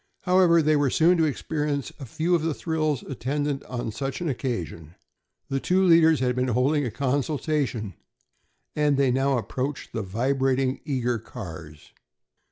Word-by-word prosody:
However, 180 Hz, -3 st, +4 dB
they 155 Hz, +1 st, +3 dB
were 145 Hz, -2 st, +2 dB
soon 170 Hz, +6 st, +3 dB
to 160 Hz, -, +4 dB
experience 145 Hz, -1 st, -2 dB
a 135 Hz, -, -8 dB
few 160 Hz, +8 st, -1 dB
of 170 Hz, -, +3 dB
the 160 Hz, -2 st, -1 dB
thrills 155 Hz, -4 st, -1 dB
attendant 140 Hz, +2 st, -2 dB
on 120 Hz, -3 st, -4 dB
such 135 Hz, +5 st, -4 dB
an 175 Hz, -2 st, -2 dB
occasion. 90 Hz, -, -4 dB, 0.5 s
The 135 Hz, -, -1 dB
two 185 Hz, +6 st, +2 dB
leaders 165 Hz, -4 st, +5 dB
had 125 Hz, -1 st, +1 dB
been 125 Hz, 0 st, 0 dB
holding 130 Hz, +5 st, +2 dB
a 125 Hz, -, -1 dB
consultation, 135 Hz, -, -1 dB, 0.8 s
and 150 Hz, -2 st, +2 dB
now 135 Hz, 0 st, +2 dB
they -, -, +1 dB
approached 130 Hz, +6 st, -4 dB
the 110 Hz, -, -2 dB
vibrating, 130 Hz, +5 st, 0 dB
eager 125 Hz, -5 st, -1 dB
cars. 80 Hz, -, -10 dB
135 Hz, 155 wpm, -25 LUFS, 125-155 Hz, 0.8 s, leaders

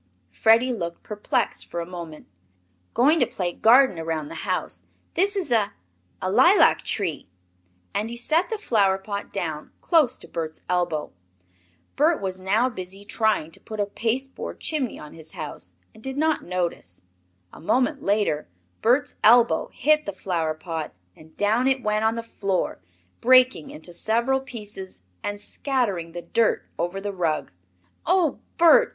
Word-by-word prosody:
Freddie 230 Hz, +3 st, +4 dB
looked 170 Hz, -6 st, -5 dB
perplexed 210 Hz, -1 st, -2 dB
for 170 Hz, -, -5 dB
a 170 Hz, -, -3 dB
moment. 170 Hz, -3 st, -8 dB, 0.7 s
"Going 295 Hz, +7 st, +4 dB
to -, -, +3 dB
play 175 Hz, -2 st, -3 dB
garden 240 Hz, -3 st, +5 dB
around 160 Hz, -2 st, -3 dB
the -, -, -7 dB
house. -, -, -2 dB, 0.3 s
This 400 Hz, +4 st, +2 dB
is 365 Hz, -9 st, -2 dB
a 215 Hz, -4 st, +2 dB, 0.5 s
a 185 Hz, -, -2 dB
lilac 265 Hz, -, +6 dB
tree!" 170 Hz, -, -2 dB, 0.6 s
And 215 Hz, +2 st, -1 dB
he 235 Hz, -, -6 dB
set 320 Hz, +9 st, +1 dB
the 445 Hz, -, -2 dB
flower 205 Hz, -, +2 dB
pot 200 Hz, +1 st, -6 dB
down 160 Hz, -6 st, -4 dB
close 305 Hz, -8 st, +3 dB
to -, -, -13 dB
Bert's 160 Hz, -1 st, -5 dB
elbow. 175 Hz, -4 st, -1 dB, 0.8 s
Bert 310 Hz, +3 st, +3 dB
was 190 Hz, -1 st, -4 dB
now 205 Hz, +6 st, +2 dB
busy 195 Hz, -3 st, -7 dB
trying 215 Hz, -7 st, 0 dB
to -, -, -11 dB
put 215 Hz, -1 st, -8 dB
a 205 Hz, -, +2 dB
pasteboard 235 Hz, +6 st, -3 dB
chimney 285 Hz, -7 st, -2 dB
on 150 Hz, -, -11 dB
his 160 Hz, -1 st, -10 dB
house, 90 Hz, -, -7 dB, 0.2 s
and -, -, -16 dB
did 265 Hz, +3 st, -5 dB
not 315 Hz, +1 st, +2 dB
notice. 175 Hz, -, -3 dB, 0.5 s
A -, -, -12 dB
moment 260 Hz, -, +1 dB
later 200 Hz, -7 st, +1 dB, 0.3 s
Bert's 250 Hz, +4 st, +2 dB
elbow 235 Hz, +1 st, +5 dB
hit 305 Hz, 0 st, +2 dB
the 200 Hz, -, -2 dB
flower 170 Hz, -4 st, -2 dB
pot 160 Hz, -, -5 dB, 0.2 s
and 155 Hz, 0 st, -18 dB
down 220 Hz, +5 st, +2 dB
it 265 Hz, -1 st, +1 dB
went 215 Hz, 0 st, +1 dB
on 220 Hz, +1 st, +2 dB
the 230 Hz, -, -4 dB
floor, 195 Hz, -, -2 dB, 0.4 s
breaking 255 Hz, -7 st, +5 dB
into 165 Hz, +3 st, -8 dB
several 235 Hz, +8 st, +1 dB
pieces 210 Hz, -, -8 dB, 0.2 s
and 205 Hz, 0 st, -4 dB
scattering 205 Hz, -, -1 dB
the 175 Hz, 0 st, -6 dB
dirt 230 Hz, -1 st, +1 dB
over 175 Hz, +3 st, -2 dB
the 200 Hz, 0 st, -4 dB
rug. 165 Hz, -5 st, -1 dB, 0.6 s
"Oh, 350 Hz, -4 st, +2 dB, 0.2 s
Bert! 405 Hz, +9 st, +6 dB
210 Hz, 160 wpm, -24 LUFS, 175-255 Hz, 0.8 s, lilac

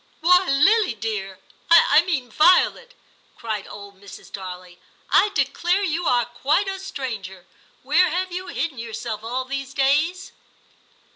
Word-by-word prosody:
* -, -, -36 dB
Why, 360 Hz, +2 st, +4 dB
Lily 360 Hz, -, +3 dB
dear, 205 Hz, -3 st, -5 dB, 0.2 s
— -, -, -36 dB
I 315 Hz, -2 st, +6 dB
mean 290 Hz, -9 st, -3 dB
Violet! 365 Hz, -, +3 dB, 0.2 s
' -, -, -35 dB
cried 215 Hz, -4 st, -5 dB
old 200 Hz, -1 st, -12 dB
Mrs. 200 Hz, -, -13 dB
Darley, 180 Hz, -2 st, -9 dB, 0.2 s
* -, -, -36 dB
I 415 Hz, -, +4 dB
declare 345 Hz, +8 st, 0 dB
you 335 Hz, -1 st, -2 dB
are 245 Hz, -1 st, +2 dB
quite 295 Hz, +10 st, 0 dB
a 385 Hz, 0 st, -4 dB
stranger; 215 Hz, -, -7 dB, 0.4 s
where 360 Hz, 0 st, +3 dB
have 365 Hz, +3 st, -2 dB
you 370 Hz, +1 st, -6 dB
hidden 305 Hz, -7 st, -4 dB
yourself 225 Hz, -1 st, -6 dB
all 250 Hz, +3 st, -3 dB
these 275 Hz, +1 st, -6 dB
days 300 Hz, +7 st, 0 dB
275 Hz, 155 wpm, -22 LUFS, 220-355 Hz, 0.4 s, I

